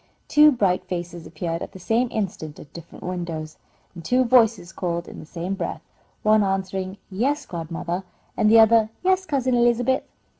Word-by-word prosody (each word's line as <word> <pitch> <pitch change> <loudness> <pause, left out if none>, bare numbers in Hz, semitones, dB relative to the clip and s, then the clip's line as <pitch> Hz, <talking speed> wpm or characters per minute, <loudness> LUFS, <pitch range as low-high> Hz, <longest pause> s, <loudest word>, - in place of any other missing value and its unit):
Two 300 0 +7
bright 195 -8 +1
faces 175 -2 -5
appeared 165 0 -4
at - - -7
the 190 - -10
same 225 +7 +1
instant 185 -9 -4
at 145 - -14
different 170 -1 -11
windows, 170 -4 -5 0.4
and 170 -2 -10
two 250 +9 +2
voices 230 -8 +3
called 170 -1 -3
in - - -10
the 155 - -11
same 175 +3 -4
breath, 195 - -4 0.4
one 215 0 +5
answering, 190 0 -2
"Yes, 275 +9 0
godmother," 170 +2 -4 0.3
and 215 - +3
the 225 +1 +7
other, 225 0 +5
"Yes, 375 0 +2
Cousin 260 -4 0
Elizabeth." 240 +2 +2
195 Hz, 165 wpm, -23 LUFS, 175-235 Hz, 0.4 s, Two